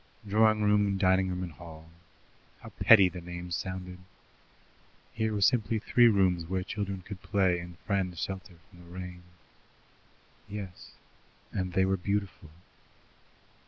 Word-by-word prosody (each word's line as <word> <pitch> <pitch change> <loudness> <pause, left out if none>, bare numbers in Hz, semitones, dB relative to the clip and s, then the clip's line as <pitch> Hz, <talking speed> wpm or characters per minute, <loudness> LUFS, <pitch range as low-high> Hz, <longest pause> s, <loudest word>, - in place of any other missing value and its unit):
Drawing 110 +1 +3
room, 105 -1 +3
dining 95 0 +3
room, 90 0 -3
and 90 - -6
hall 80 +1 -12 0.7
how - - -10
petty 100 -5 +6
the 90 -1 -7
names 85 0 -5
sounded! 90 -1 -5 1.1
Here 110 0 -1
were 105 -1 -2
simply 110 0 +3
three 120 +2 +4
rooms 95 -5 +3
where 95 +1 -1
children 100 -2 -4
could 100 0 -9
play 95 -4 +1
and 85 0 -10
friends 95 -4 -1
shelter 95 +1 -5 0.2
from 90 - -17
the 85 -1 -15
rain. 90 0 -8 1.3
Yes, 100 -3 -8 0.6
and 95 -2 -3
they 95 +1 +3
were 95 0 +1
beautiful. 100 -2 -3
95 Hz, 135 wpm, -29 LUFS, 90-100 Hz, 1.3 s, petty